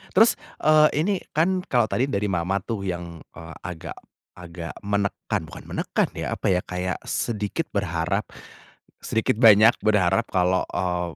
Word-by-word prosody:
Terus, 225 +4 +5 0.2
eee, 155 0 +6
ini 200 +4 +1 0.2
kan 180 +5 +2
kalau 120 -3 +1
tadi 130 - +1
dari 105 -6 -1
mama 90 +2 -1
tuh 105 -4 -4
yang, 85 -2 -5 0.2
eee, 80 -1 -10
agak 85 -3 -7 0.4
agak 85 -1 -8
menekan 100 -2 -2
bukan - - -11
menekan - - -1
ya, - - -3
apa - - -5
ya, 90 - +3
kayak 90 0 -3
sedikit 110 +8 -2
berharap, 90 0 -1 0.8
sedikit 110 -1 0
banyak 110 -1 +7
berharap 105 +1 +2
kalau, 90 -1 +2
eee, 90 -2 -2
100 Hz, 145 wpm, -24 LUFS, 90-115 Hz, 0.8 s, banyak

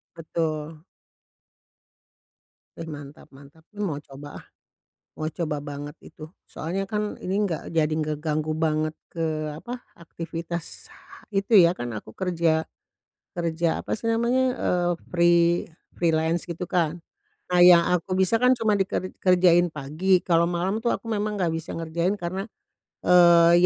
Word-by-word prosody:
Betul. 160 -1 -4 1.9
Eh, 165 - -6
mantap 145 0 -10
mantap. 145 +4 -17
Mmm, 210 0 -4
mau 145 -2 -3
coba 140 +1 -11
ah, - - -24 0.7
mau 155 0 -3
coba 155 -3 -3
banget 145 0 -7
itu, 155 - -11 0.2
soalnya 185 +5 -4
kan 210 0 -2
ini 185 +1 -2
enggak 165 -4 -3
jadi 160 -2 +2
ngeganggu 155 0 -2
banget 155 -1 0 0.2
ke 155 -2 -3
apa, 245 +8 -7 0.2
aktivitas 165 0 -7
ha - - -17
itu 200 +3 +3
ya, 170 -2 +7
kan 120 -9 -5
aku 110 +1 -9
kerja 165 -3 0 0.7
kerja 170 0 0 0.2
apa - - -4
sih 230 +1 -4
namanya, 235 +3 +2
eee, 175 -1 0 0.2
free 170 -1 +4 0.5
freelance 165 0 +1
gitu 170 +1 -4
kan. 170 -1 0 0.5
Nah, 180 - +4
yang 175 -1 +8
aku 185 +2 -1
bisa 205 +5 +2
kan 250 - +6
cuma 220 -2 +2
diker 190 -1 -1
dikerjain 175 -1 +4
pagi, 155 +7 +1
kalo 170 -1 +3
malam 190 +6 -1
tuh 235 - +1
aku - - -17
memang 210 -1 -2
nggak 170 -3 0
bisa 165 - -5
ngerjain, 170 +5 -1
karena, 190 +5 -4 0.6
eee, 170 -1 +7
170 Hz, 140 wpm, -25 LUFS, 155-185 Hz, 1.9 s, yang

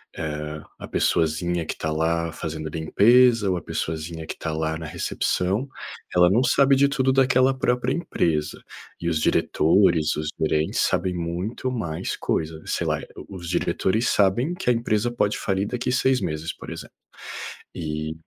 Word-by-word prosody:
Eh, 75 0 -4 0.2
a - - -7
pessoazinha 85 +1 0
que - - -3
está 80 - -3
lá 85 +1 0
fazendo 80 0 -5
limpeza 110 +8 +4
ou 90 - +1
a - - -5
pessoazinha 80 0 -4
que - - -4
está 80 - -4
lá 80 0 -1
na 80 - -7
recepção. 95 - -1 0.5
Ela 90 0 +6
não 115 +7 +3
sabe 140 +1 +4
de 140 +1 +4
tudo 130 -1 +1
daquela 130 0 +3
própria 125 0 +1
empresa 80 - -1 0.4
e 85 - -1
os 80 -2 0
diretores, 80 0 +3
os 75 0 -3
gerentes 80 0 0
sabem 90 0 +1
muito 90 +9 -3
mais 85 -11 -3
coisa. 80 0 -2
Sei - - -1
lá, - - 0
eh - - -10 0.2
os 85 -3 -7
diretores 100 +5 0
sabem 105 - +2
que 180 -8 -2
a - - +5
empresa 115 0 0
pode 105 -3 0
falir 95 0 0
daqui 125 +2 -2
6 130 0 +2
meses, 75 +1 -3
por - - -10
exemplo. - - -9 0.8
E, 80 -1 -4
90 Hz, 165 wpm, -24 LUFS, 80-120 Hz, 0.8 s, Ela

